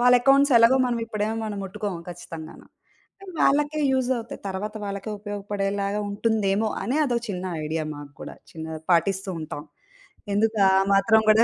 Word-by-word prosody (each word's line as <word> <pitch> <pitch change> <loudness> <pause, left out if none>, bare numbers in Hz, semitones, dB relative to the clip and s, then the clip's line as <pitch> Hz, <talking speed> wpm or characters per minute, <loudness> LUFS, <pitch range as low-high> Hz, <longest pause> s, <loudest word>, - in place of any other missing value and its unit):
వాళ్ళ 250 +1 +6
అకౌంట్స్ 275 +1 +5
ఎలాగో 230 +3 +6
మనం 240 -1 -1
ఇప్పుడేం 215 -1 -2
మనం 210 -2 -4
ముట్టుకోము 195 -2 -4
ఖచ్చితంగాను. 165 -2 -9 0.6
అవి 375 -2 -9
వాళ్ళకే 295 +2 +3
యూజ్ 260 -1 +1
అవుతాయి. 230 0 -7
తర్వాత 205 +3 -4
వాళ్ళకే 200 +2 -4
ఉపయోగపడేలాగా 205 0 -2
ఉంటుందేమో 215 0 +1
అనే 260 +5 -1
అదో 245 -3 0
చిన్న 185 -2 -4 0.2
ఐడియా 155 +1 -2
మాకు 145 -1 -10
కూడా, - - -7 0.2
చిన్న 160 -1 -7 0.3
పాటిస్తూ 190 +3 +1
ఉంటాం. 150 -1 -6 0.7
ఎందుకు 220 +1 +2
ఆ - - +4 0.2
మాత్రం 220 +3 +5
కూడా 220 +2 +6
205 Hz, 150 wpm, -25 LUFS, 190-230 Hz, 0.7 s, వాళ్ళ